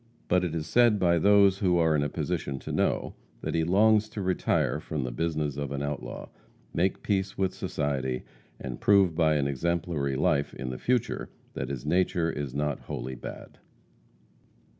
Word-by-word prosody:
But 90 +1 +3
it 85 -2 -2
is 80 -2 -2
said 120 +4 +4
by 85 -3 +3
those 100 +1 +5
who 90 -3 +2
are 80 -2 +3
in 75 - +2
a 75 - 0
position 70 0 -3
to - - -6
know, - - 0 0.3
that - - -3
he 80 - +1
longs 105 +5 +4
to 110 -2 -5
retire 90 -4 +1
from 80 -3 -4
the 65 - -3
business 75 +1 -2
of 70 -1 -3
an 70 0 -3
outlaw, 75 0 -5 0.4
make 95 +3 0
peace 95 -1 -1
with 95 -1 0
society 70 -9 -2 0.4
and 65 -2 -6
prove 100 -4 +5
by 80 -2 +3
an 70 -2 +1
exemplary 70 0 -1
life 70 +1 +1
in 65 -2 -4
the 65 - -6
future 125 -2 0 0.2
that - - -4
his 70 -1 -5
nature 85 0 +1
is 70 -4 -5
not 75 -1 -1
wholly 65 +2 -5
bad. - - -9
80 Hz, 180 wpm, -28 LUFS, 70-95 Hz, 0.4 s, those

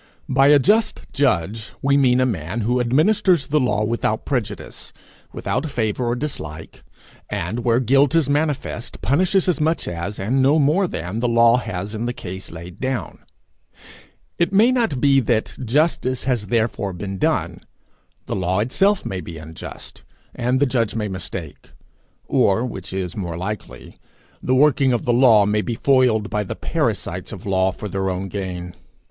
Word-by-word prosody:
By 135 +1 +4
a 145 0 +7
just 210 - +2
judge 110 - 0
we 140 +1 +3
mean 130 -3 +4
a 130 - +3
man 100 -1 -3
who 120 +4 +1
administers 160 - +3
the 150 +1 +1
law 125 -5 +1
without 110 -1 -1
prejudice, 110 -7 -4 0.4
without 145 +5 -2
favour 120 -1 -1
or 120 - 0
dislike; 80 - -6 0.5
and 105 +4 -3
where 120 0 +3
guilt 135 +4 +3
is 165 -5 +3
manifest, 145 -5 -2
punishes 180 - +2
as 175 -3 +1
much 160 +2 0
as, 85 +4 -4
and 120 +8 0
no 140 +4 +4
more 160 +6 +3
than, 90 - -4
the 120 - 0
law 115 0 +5
has 105 -3 -4
in 110 +2 -3
the 120 - -2
case 95 -3 -7
laid 85 +1 -10
down. 130 -2 -3 1.2
It 170 +1 +2
may 215 +6 +5
not 230 - 0
be 140 0 +4
that 115 -3 0
justice 130 0 +1
has 120 -6 -1
therefore 110 -3 -1
been 95 +1 -6
done. - - 0 0.6
The - - -3
law 95 -1 0
itself 190 - +1
may 95 -2 -3
be 80 0 -8
unjust, 80 +1 -10 0.3
and 125 +2 0
the 145 - +4
judge 120 -5 0
may 105 -2 -2
mistake; 95 -2 -7 0.5
or, 105 +5 +2
which 95 -6 -7
is 95 -2 -4
more 85 -5 -4
likely, 90 - -7 0.4
the 130 - +1
working 135 -1 +4
of 120 - -1
the 120 - +2
law 120 -4 +6
may 105 +1 +1
be 115 +2 -3
foiled 125 -5 +2
by 105 0 0
the 95 - -5
parasites - - -2
of - - -9
law 95 -1 +2
for 105 - -7
their 95 0 -2
own 95 +1 -3
gain. 90 -2 -5
120 Hz, 170 wpm, -21 LUFS, 95-135 Hz, 1.2 s, a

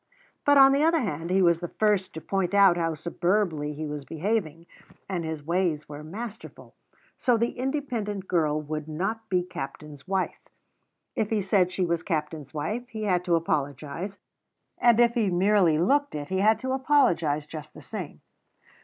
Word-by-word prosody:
but, 285 0 +6
on 270 0 +8
the 280 +1 +2
other 330 +1 +4
hand, 165 -6 -3
he 190 +1 +3
was 170 -1 +4
the 175 - -4
first 205 -1 +1
to 160 - -7
point 195 +3 -1
out 195 -3 +7
how 165 -2 -1
superbly 170 -1 0
he 155 +1 -4
was 150 -1 -5
behaving, 165 0 -2 0.4
and 180 -3 -2
his 160 -2 -5
ways 170 -3 0
were 150 0 -8
masterful, 215 +7 -8 0.5
so 245 -3 +3
the 235 +1 0
independent 240 -8 -3
girl 155 -4 +1
would 155 0 -5
not 205 +8 -3
be 180 -1 +2
captain's 150 -4 -8
wife; 190 -1 -1 0.8
if 215 - 0
he 220 - +1
said 190 -2 +2
she 185 0 0
was 170 -1 0
captain's 150 -4 -3
wife 215 - -4
he 220 -2 -5
had 180 -4 +1
to 175 -2 +2
apologize, 155 +4 -2 0.6
and 235 -1 +5
if 235 -1 +5
he 225 -5 +1
merely 180 -2 +3
looked 285 - +2
it 145 -1 -5
he 190 - 0
had 215 +3 +4
to 260 0 -4
apologize 175 - +2
just 155 0 -9
the - - -10
same. - - -7
180 Hz, 175 wpm, -26 LUFS, 155-215 Hz, 0.8 s, on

